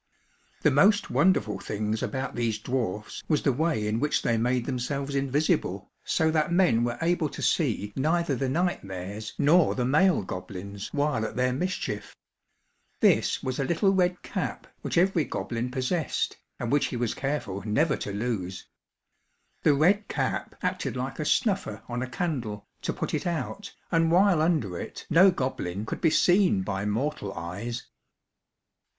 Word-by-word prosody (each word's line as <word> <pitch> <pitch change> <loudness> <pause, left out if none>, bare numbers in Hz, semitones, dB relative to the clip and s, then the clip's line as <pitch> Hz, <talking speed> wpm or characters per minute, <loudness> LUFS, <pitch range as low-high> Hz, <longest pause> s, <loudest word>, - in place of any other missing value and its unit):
The 150 - +5
most 200 +10 +4
wonderful 175 - +2
things 105 +1 -2
about 130 0 -3
these 115 -3 -1
dwarfs 110 -3 -3
was 150 -3 +1
the 135 - +3
way 155 -5 0
in 105 +2 0
which 150 +3 +1
they 115 - +2
made 120 +1 +1
themselves 140 +2 -2
invisible, 140 +2 0
so 160 0 +2
that 155 +1 +1
men 170 -10 +4
were 120 0 -1
able 165 -2 +1
to - - -8
see 110 - +1
neither 160 +1 +1
the 130 +1 -1
night 175 +6 0
mares 100 +3 -6
nor 165 +4 +4
the 125 - 0
male 150 - +3
goblins, 95 +2 -6
while 145 -5 0
at 110 - -4
their 125 0 +1
mischief. 140 - -3 0.8
This - - +3
was 130 +1 -2
a - - +2
little 185 +7 +2
red 180 -1 +1
cap - - -4 0.2
which - - -2
every 175 -2 +3
goblin 120 -3 -3
possessed, 130 +5 -1 0.2
and 120 -1 -2
which 145 0 +3
he 125 - -4
was 120 -2 0
careful 135 -9 -3
never 140 +8 +2
to 100 - -5
lose. 100 -4 -3 1.0
The 145 - +4
red 195 +8 +3
cap - - -2
acted - - -1
like - - -4
a - - -1
snuffer 190 - 0
on 120 0 -3
a 130 - -3
candle, 125 - -3 0.2
to - - -1
put - - -4
it - - -1
out, 170 +5 -3 0.2
and 165 -1 +3
while 185 -2 +5
under 150 - +1
it, - - -7
no 185 +5 +7
goblin 110 - -2
could - - -5
be 165 - +5
seen 175 - +4
by 95 +1 -3
mortal 110 -1 -2
eyes. 100 +8 -5
130 Hz, 165 wpm, -27 LUFS, 110-165 Hz, 1.0 s, no